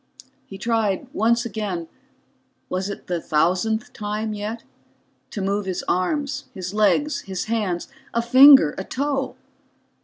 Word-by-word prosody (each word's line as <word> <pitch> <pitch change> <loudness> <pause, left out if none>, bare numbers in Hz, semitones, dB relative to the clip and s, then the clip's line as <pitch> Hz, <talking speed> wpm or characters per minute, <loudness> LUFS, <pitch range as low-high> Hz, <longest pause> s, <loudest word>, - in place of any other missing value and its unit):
He 195 - -9
tried 215 -3 0
once 235 +3 +2
again 200 -7 -4 0.8
was 185 +2 -2
it 200 - -7
the 175 -2 -2
thousandth 185 +9 0
time 215 +1 -3
yet? 210 +3 -5 0.7
to 200 - -4
move 200 +1 -1
his 185 - -3
arms, 285 - -1
his 185 0 -5
legs, 215 +8 +2
his 190 -2 -5
hands, 210 -6 -2 0.2
a 235 - 0
finger, 260 - +8
a - - -3
toe. 275 +3 -2
210 Hz, 130 wpm, -23 LUFS, 190-235 Hz, 0.8 s, finger